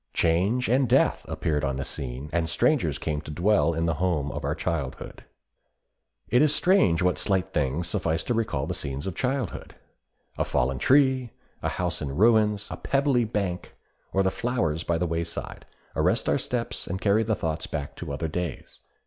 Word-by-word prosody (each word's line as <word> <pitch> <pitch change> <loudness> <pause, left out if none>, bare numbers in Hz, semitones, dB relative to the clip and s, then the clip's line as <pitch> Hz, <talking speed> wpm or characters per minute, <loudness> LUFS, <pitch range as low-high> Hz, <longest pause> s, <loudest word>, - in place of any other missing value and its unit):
Change 95 +10 +2
and 130 +1 +2
death - - +3
appeared 75 -2 -1
on 70 -2 0
the 70 0 -3
scene, 65 +2 -6
and 85 -1 0
strangers 85 - +2
came 75 -2 -2
to 75 - -11
dwell 85 +1 +2
in 80 +1 0
the 80 - +1
home 75 -6 0
of - - -5
our 70 +2 -1
childhood. 80 -5 -4 1.0
It 125 - +4
is 150 -1 +4
strange 95 - +3
what 90 0 +2
slight 95 -3 0
things 75 +5 0
suffice 85 -4 -1
to 120 - -1
recall 110 - -1
the - - -3
scenes 70 +1 -4
of 95 - -3
childhood. 125 0 -3 0.6
A - - +3
fallen 65 +1 0
tree, 130 - +4 0.3
a - - 0
house - - -2
in 70 -2 -4
ruins, 105 0 +3
a - - -4
pebbly 135 -3 +2
bank, 100 -5 -3 0.4
or 95 - +2
the 95 - +2
flowers 85 -11 -1
by 85 -1 0
the 90 - 0
wayside, 85 0 -4 0.3
arrest - - +2
our - - +2
steps, - - -3
and 95 +2 -3
carry 105 +2 +3
the 110 -1 +1
thoughts 80 -3 -3
back 70 -2 -5
to - - -6
other 70 +4 -2
days. 85 -1 -5
85 Hz, 185 wpm, -26 LUFS, 75-110 Hz, 1.0 s, It